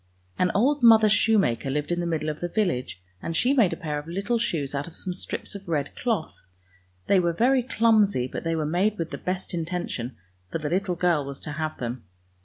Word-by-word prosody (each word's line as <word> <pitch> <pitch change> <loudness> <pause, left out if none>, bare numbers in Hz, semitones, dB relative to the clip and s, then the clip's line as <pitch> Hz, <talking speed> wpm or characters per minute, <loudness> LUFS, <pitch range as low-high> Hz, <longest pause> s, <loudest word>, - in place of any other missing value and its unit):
An 180 - +3
old 280 +7 +3
mother 225 -2 +7
shoemaker 195 - +2
lived 150 +3 -2
in 175 - 0
the 175 - -1
middle 155 -2 -1
of 150 - -4
the 175 - -2
village, 165 - -1 0.2
and 165 - -3
she 255 +3 +3
made 230 -10 +4
a - - -3
pair 150 -4 -3
of 145 - -11
little 200 +7 -1
shoes 150 -11 -1
out 140 +2 -2
of 170 - -11
some 185 - -2
strips 180 - -5
of 200 -2 -8
red 145 -3 -1
cloth. 225 -10 -2 0.6
They 195 - +4
were 170 -1 +1
very 255 +8 +3
clumsy, 220 - +3
but - - -6
they 165 -1 0
were 155 -1 -1
made 190 +7 +1
with 165 -1 -3
the - - -5
best 185 0 -3
intention, 165 -7 -3 0.3
for - - -1
the 155 -1 -4
little 185 0 0
girl 175 -4 +2
was 140 0 -7
to 155 - -5
have 155 +1 -3
them. 120 -1 -4
175 Hz, 220 wpm, -25 LUFS, 150-205 Hz, 0.6 s, mother